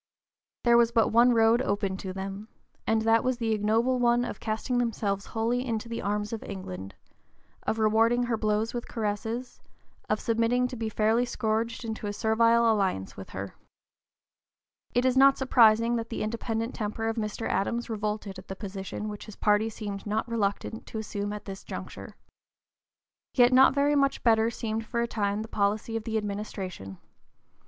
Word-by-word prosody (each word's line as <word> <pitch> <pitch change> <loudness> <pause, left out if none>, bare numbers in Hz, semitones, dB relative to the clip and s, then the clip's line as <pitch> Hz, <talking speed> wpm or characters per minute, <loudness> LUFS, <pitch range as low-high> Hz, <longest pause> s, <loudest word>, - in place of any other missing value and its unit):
There 235 -1 +5
was 235 -1 +4
but 225 -2 +3
one 235 +3 +6
road 225 +2 +4
open 200 -5 -1
to 190 -1 -5
them, 195 +2 -6 0.4
and 220 0 +2
that 225 0 +4
was 255 -1 0
the 230 -2 -1
ignoble 225 +4 +2
one 240 0 +3
of - - -6
casting 225 +3 -1
themselves 205 -4 -1
wholly 230 +2 0
(p. 250 - -3
048) - - -5
into 220 +1 -5
the 230 - -4
arms 210 +2 -2
of 225 - -4
England, 95 - -7 0.7
of 220 - +1
rewarding 225 +2 +3
her 240 -1 0
blows 215 0 0
with 240 -1 -4
caresses, 225 +3 -3 0.5
of 215 - +1
submitting 230 +2 +1
to 255 - -6
be 225 -2 -3
fairly 220 +3 +2
scourged 230 0 -2
into 220 -1 -4
a 205 - -3
servile 230 +1 +3
alliance 190 - -1
with 95 - -9
her. 100 0 -6 1.4
It 245 +1 +3
is 255 -1 +3
not 275 +1 +6
surprising 230 -2 +4
that 230 0 -4
the 225 - -3
independent 225 +2 -2
temper 220 0 -3
of 225 +1 -2
Mr. 215 0 -3
Adams 235 +4 -1
revolted 210 -3 -3
at 185 - -14
the 190 - -5
position 195 +1 -6
which 210 +1 -7
his 215 - -10
party 210 +1 +2
seemed 205 -2 -6
not 215 +2 -1
reluctant 220 0 -2
to - - -6
assume 205 -1 -3
at 210 -1 -6
this 195 -1 -7
juncture. - - -8 1.2
Yet 245 0 +5
not 265 +2 +6
very 285 +1 +3
much 275 -1 +1
better 225 -1 +4
seemed 225 -1 -3
for 235 +1 -2
a 235 - 0
time 205 -2 -1
the - - -8
policy 215 +1 -1
of 225 -1 -3
the 225 -1 -1
administration. 195 - -5
220 Hz, 180 wpm, -28 LUFS, 210-235 Hz, 1.4 s, one